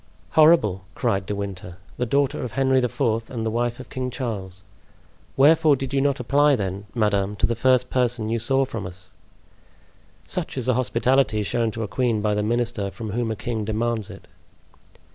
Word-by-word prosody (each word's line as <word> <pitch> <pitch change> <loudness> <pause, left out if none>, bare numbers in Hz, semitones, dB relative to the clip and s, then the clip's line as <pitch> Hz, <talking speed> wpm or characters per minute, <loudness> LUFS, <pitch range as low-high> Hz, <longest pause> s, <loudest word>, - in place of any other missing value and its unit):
"Horrible!" 130 - +4
cried 95 -1 -1
De 105 - -2
Winter; 95 -3 -6 0.2
"the 125 - -1
daughter 140 +3 +1
of 125 - -5
Henry 135 0 +3
IV., 115 -3 -1
and 115 -3 -4
the 110 - 0
wife 120 +1 -1
of 130 - -11
King 130 -1 -3
Charles! 100 -8 -5 0.7
Wherefore 155 +2 +5
did 135 0 -5
you 135 - +2
not 140 0 +1
apply, 140 +4 +3
then, 100 -1 -4
madame, 105 -2 +1
to 105 - +1
the 115 - 0
first 125 +2 +2
person 120 -3 0
you 115 +1 -1
saw 135 +4 +2
from 115 -7 -5
us?" 90 0 -10 1.1
"Such - - -3
is 130 - -2
the 130 - +3
hospitality 125 -2 +1
shown 115 +3 0
to 110 +1 -4
a - - -3
queen 115 +2 0
by 105 0 0
the 105 - 0
minister 115 -2 -1
from 110 +1 -7
whom 115 +2 -1
a 110 - -2
king 110 0 -3
demands 110 0 -2
it." - - -12
115 Hz, 185 wpm, -23 LUFS, 105-130 Hz, 1.1 s, Wherefore